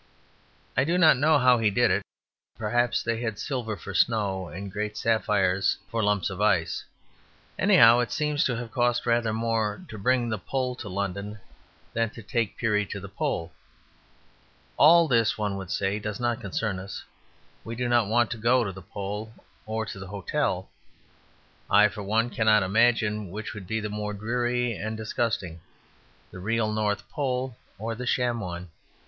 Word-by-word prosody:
I 130 Hz, -, +3 dB
do 170 Hz, +5 st, +1 dB
not 165 Hz, -5 st, +7 dB
know 155 Hz, +3 st, +4 dB
how 125 Hz, -3 st, +5 dB
he 110 Hz, -2 st, +3 dB
did 120 Hz, +3 st, +3 dB
it; -, -, +2 dB, 0.6 s
perhaps 120 Hz, +2 st, +1 dB
they 115 Hz, 0 st, -1 dB
had 110 Hz, -4 st, -3 dB
silver 120 Hz, -5 st, -3 dB
for 95 Hz, +2 st, -8 dB
snow 95 Hz, -2 st, +1 dB
and 95 Hz, +3 st, -7 dB
great 105 Hz, +1 st, -3 dB
sapphires 100 Hz, -4 st, +2 dB
for 115 Hz, -, 0 dB
lumps 105 Hz, -1 st, +1 dB
of 95 Hz, +2 st, -5 dB
ice. 95 Hz, -6 st, +1 dB, 0.8 s
Anyhow, 115 Hz, +1 st, +7 dB
it 120 Hz, -3 st, -1 dB
seems 150 Hz, -1 st, 0 dB
to 125 Hz, -, 0 dB
have 115 Hz, -1 st, -6 dB
cost 120 Hz, -1 st, +1 dB
rather 115 Hz, -2 st, +2 dB
more 115 Hz, -, -1 dB
to 110 Hz, -, -8 dB
bring 125 Hz, +3 st, +2 dB
the 110 Hz, -3 st, -2 dB
Pole 130 Hz, +5 st, -2 dB
to 105 Hz, -, -7 dB
London 100 Hz, +2 st, -4 dB, 0.5 s
than 115 Hz, -1 st, +1 dB
to 115 Hz, 0 st, -12 dB
take 115 Hz, 0 st, -1 dB
Peary 105 Hz, -3 st, +1 dB
to 100 Hz, -, -5 dB
the 100 Hz, 0 st, -9 dB
Pole. 85 Hz, -3 st, -2 dB, 1.2 s
All 165 Hz, +2 st, +7 dB
this, 115 Hz, -5 st, +2 dB
one 105 Hz, -2 st, -1 dB
would 95 Hz, -2 st, -7 dB
say, 100 Hz, +2 st, -1 dB
does 105 Hz, +1 st, -5 dB
not 120 Hz, -1 st, -1 dB
concern 100 Hz, 0 st, -2 dB
us. 95 Hz, +1 st, -7 dB, 0.6 s
We 115 Hz, -, -6 dB
do 125 Hz, +1 st, -1 dB
not 120 Hz, -3 st, +3 dB
want 120 Hz, +2 st, +2 dB
to 120 Hz, -, -3 dB
go 120 Hz, +3 st, +3 dB
to 100 Hz, -, -3 dB
the 95 Hz, 0 st, -10 dB
Pole 105 Hz, +3 st, -6 dB, 0.4 s
or 110 Hz, 0 st, -2 dB
to 100 Hz, -, -7 dB
the 95 Hz, -, -8 dB
hotel. 100 Hz, 0 st, -2 dB, 1.0 s
I, 105 Hz, +1 st, +6 dB
for 105 Hz, -, -8 dB
one, 110 Hz, +4 st, 0 dB
cannot 110 Hz, -2 st, +4 dB
imagine 105 Hz, 0 st, +2 dB
which 105 Hz, +4 st, -6 dB
would 100 Hz, -4 st, -9 dB
be 110 Hz, +2 st, -1 dB
the 105 Hz, -, -3 dB
more 105 Hz, 0 st, -4 dB
dreary 120 Hz, +3 st, -1 dB
and 110 Hz, +1 st, -4 dB
disgusting 110 Hz, -6 st, -2 dB, 0.7 s
the -, -, -9 dB
real 110 Hz, +2 st, 0 dB
North 105 Hz, -3 st, -1 dB
Pole 130 Hz, -3 st, -2 dB, 0.2 s
or 115 Hz, +3 st, -3 dB
the 125 Hz, +2 st, -6 dB
sham 120 Hz, -1 st, +1 dB
one. 90 Hz, -3 st, -6 dB
110 Hz, 175 wpm, -26 LUFS, 100-120 Hz, 1.2 s, not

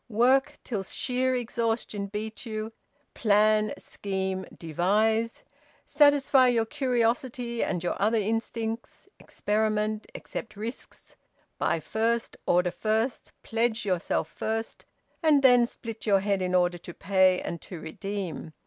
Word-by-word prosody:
Work 265 Hz, +6 st, +3 dB
till 215 Hz, -6 st, -3 dB
sheer 255 Hz, +6 st, 0 dB
exhaustion 225 Hz, -4 st, -2 dB
beat 215 Hz, +2 st, -5 dB
you. 220 Hz, -1 st, -5 dB, 0.4 s
Plan, 215 Hz, 0 st, +3 dB
scheme, 190 Hz, -1 st, -4 dB
devise! 215 Hz, +8 st, +1 dB, 0.4 s
Satisfy 285 Hz, -3 st, +5 dB
your 235 Hz, -2 st, +2 dB
curiosity 245 Hz, -2 st, 0 dB
and 175 Hz, -2 st, -2 dB
your 175 Hz, -, -2 dB
other 220 Hz, +3 st, +3 dB
instincts! 225 Hz, +2 st, -3 dB
Experiment! 215 Hz, 0 st, -1 dB
Accept 225 Hz, -, -7 dB
risks! 225 Hz, +4 st, -8 dB, 0.4 s
Buy 165 Hz, -, +1 dB
first, 225 Hz, +7 st, -1 dB
order 180 Hz, 0 st, +3 dB
first, 220 Hz, +6 st, -1 dB
pledge 230 Hz, 0 st, 0 dB
yourself 180 Hz, -4 st, 0 dB
first; 225 Hz, +6 st, -4 dB, 0.4 s
and 300 Hz, -4 st, +4 dB
then 245 Hz, -2 st, +6 dB
split 225 Hz, -2 st, -7 dB
your 200 Hz, -2 st, +4 dB
head 200 Hz, -1 st, 0 dB
in 185 Hz, 0 st, 0 dB
order 175 Hz, -1 st, +2 dB
to 175 Hz, 0 st, -10 dB
pay 185 Hz, -1 st, +3 dB
and 170 Hz, -, -5 dB
to 180 Hz, -, -8 dB
redeem! 175 Hz, 0 st, -5 dB
220 Hz, 120 wpm, -27 LUFS, 195-235 Hz, 0.4 s, then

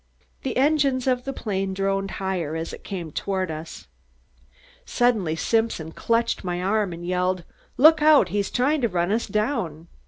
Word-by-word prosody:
The 260 Hz, -3 st, -3 dB
engines 275 Hz, -2 st, +2 dB
of 250 Hz, -1 st, 0 dB
the 275 Hz, -, -2 dB
plane 195 Hz, -6 st, -3 dB
droned 195 Hz, 0 st, -1 dB
higher 180 Hz, -5 st, -2 dB
as 165 Hz, 0 st, -4 dB
it -, -, -10 dB
came 175 Hz, -6 st, -6 dB
toward 190 Hz, 0 st, -2 dB
us. 155 Hz, +1 st, -8 dB, 1.0 s
Suddenly 215 Hz, -10 st, +1 dB
Simpson 225 Hz, -4 st, 0 dB
clutched 230 Hz, +5 st, 0 dB
my 175 Hz, -1 st, -2 dB
arm 200 Hz, +1 st, 0 dB
and 170 Hz, 0 st, -7 dB
yelled: 180 Hz, 0 st, 0 dB, 0.3 s
"Look 310 Hz, +3 st, +7 dB
out! 300 Hz, -, +6 dB
he's 200 Hz, +1 st, -1 dB
trying 280 Hz, +4 st, +1 dB
to 235 Hz, -, +1 dB
run 175 Hz, 0 st, 0 dB
us 225 Hz, +2 st, 0 dB
down." 210 Hz, -, -2 dB
195 Hz, 160 wpm, -24 LUFS, 180-245 Hz, 1.0 s, Look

